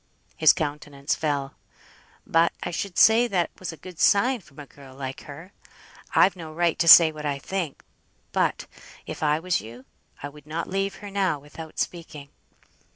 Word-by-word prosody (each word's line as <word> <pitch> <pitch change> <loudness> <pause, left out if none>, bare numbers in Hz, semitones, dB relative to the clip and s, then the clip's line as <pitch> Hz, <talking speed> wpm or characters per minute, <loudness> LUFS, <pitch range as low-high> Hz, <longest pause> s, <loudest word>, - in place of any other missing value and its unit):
His 155 -2 +6
countenance 145 -2 -3
fell. 140 -3 -2 0.7
"But 165 +1 +2
I 175 - -4
should 175 +1 -5
say 230 +2 +6
that 180 -6 -1
was 185 - -5
a 165 - -11
good 180 +2 -12
sign 240 +5 +3
from 140 -6 -22
a 145 - -9
girl 135 -2 -16
like 135 -1 -7
her. 165 +7 -11 0.6
I've 190 - +5
no 165 -3 -9
right 170 +1 0
to 170 - +1
say 165 -1 +10
what 155 -1 -9
I 145 -2 -2
think; 170 0 -5 0.5
but, - - 0 0.4
if - - -8
I 150 -1 +2
was 180 +1 -1
you, 120 +4 -12 0.4
I - - -3
would 150 +1 -15
not 165 +2 -4
leave 195 +1 -2
her 200 - -8
now 190 -5 0
without 150 +3 -12
speaking." 155 -5 -5
160 Hz, 175 wpm, -25 LUFS, 145-180 Hz, 0.7 s, say